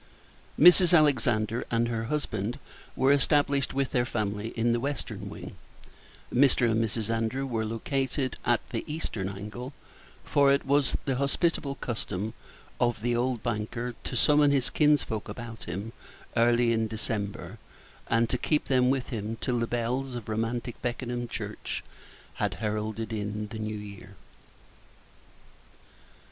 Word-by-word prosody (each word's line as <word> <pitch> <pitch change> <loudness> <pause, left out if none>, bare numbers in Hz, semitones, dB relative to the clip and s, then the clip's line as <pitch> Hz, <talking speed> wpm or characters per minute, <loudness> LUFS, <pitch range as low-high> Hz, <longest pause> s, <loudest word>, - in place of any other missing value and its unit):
Mrs. 180 +2 +8
Alexander 120 -6 +2
and 115 0 +2
her 115 -1 -2
husband 120 -4 -2 0.4
were 135 +2 +4
established 140 0 +3
with 135 -1 0
their 120 - +2
family 105 -3 -2
in 115 +1 +2
the 120 - +1
western 140 +3 -4
wing; - - -8 0.8
Mr. 125 -1 +5
and 110 +1 +2
Mrs. 115 0 -2
Andrew 115 +4 -1
were 115 -4 -1
located 130 +4 -1
at - - +1
the - - -2
eastern 110 -11 -3
angle; 105 +7 -7 0.5
for 140 -1 +4
it 140 - +2
was 140 0 +3
the 135 -2 0
hospitable 140 +1 0
custom 110 -4 -3 0.5
of 120 -3 +1
the 120 +1 +1
old 120 -1 0
banker 115 +3 -2
to - - -4
summon 145 +3 +5
his 140 -3 +2
kinsfolk 145 -9 +2
about 115 +1 -7
him 100 +6 -5 0.4
early 120 0 +4
in 110 -1 +1
December, 110 -2 -4 0.5
and 115 0 +3
to 125 - -1
keep 150 -1 0
them 125 -1 +4
with 135 -1 0
him 110 -1 -3
till 125 -2 0
the 115 - 0
bells 125 +3 -1
of 120 -4 -6
romantic 115 +2 -2
Beckenham 120 0 -2
church - - -5 0.6
had - - 0
heralded 110 +1 -3
in 105 0 -3
the 110 - -6
New 110 0 -3
Year. 100 -2 -10
120 Hz, 140 wpm, -28 LUFS, 110-135 Hz, 0.8 s, Mrs